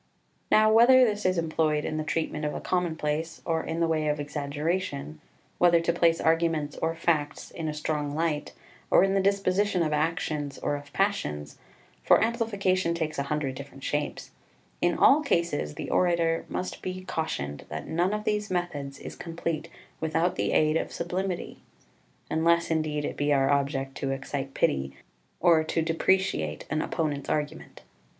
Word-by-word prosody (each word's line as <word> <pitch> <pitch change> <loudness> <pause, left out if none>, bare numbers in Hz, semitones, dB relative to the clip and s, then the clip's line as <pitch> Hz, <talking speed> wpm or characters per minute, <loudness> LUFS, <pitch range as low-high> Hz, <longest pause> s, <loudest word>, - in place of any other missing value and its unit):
2 - - +5
Now 215 0 +5
whether 255 +3 +7
this 210 -3 0
is 185 -1 +1
employed 155 -2 +1
in 155 - -2
the 155 - -1
treatment 155 0 -2
of 150 - -2
a - - -3
commonplace, 160 -2 -1
or 165 -1 0
in 165 +1 -3
the 165 - +3
way 155 -1 0
of 150 0 0
exaggeration, 145 - -3 0.4
whether 175 -1 +6
to 170 0 0
place 170 -1 +3
arguments 160 -2 +1
or 165 0 -1
facts 160 -3 -1
in 165 -2 -5
a 155 - -2
strong 150 -1 -2
light, 160 -2 -1 0.4
or - - +6
in 195 0 +2
the 195 - +3
disposition 195 -1 +2
of 155 -1 -1
actions, 150 -2 -1
or 145 - -1
of 145 0 -9
passions 75 - -1 0.4
for - - +5
amplification 200 -7 +1
takes 160 -3 -2
a - - +1
hundred 150 -3 -1
different 135 0 -10
shapes 145 +2 -3 0.5
in - - +2
all 285 +3 +6
cases 170 - 0
the - - -5
orator 170 -2 +2
must 185 - -4
be 185 0 -5
cautioned 75 - -3
that - - -5
none 175 +4 +1
of 210 0 -2
these 210 0 -1
methods 145 -7 -3
is - - -8
complete 165 -1 -4 0.3
without 160 +3 0
the - - 0
aid 155 +1 +3
of - - -3
sublimity, 185 0 -3 0.7
unless, 170 +1 +2
indeed, 155 -2 0
it - - -4
be 145 0 0
our 135 -1 +3
object 140 -1 0
to 135 - -2
excite 135 0 -4
pity, 70 0 0 0.4
or 165 -2 +5
to 160 +1 -1
depreciate 165 - 0
an 155 +1 +1
opponent's 150 -5 -2
argument. 150 -1 -3
160 Hz, 170 wpm, -27 LUFS, 145-175 Hz, 0.7 s, whether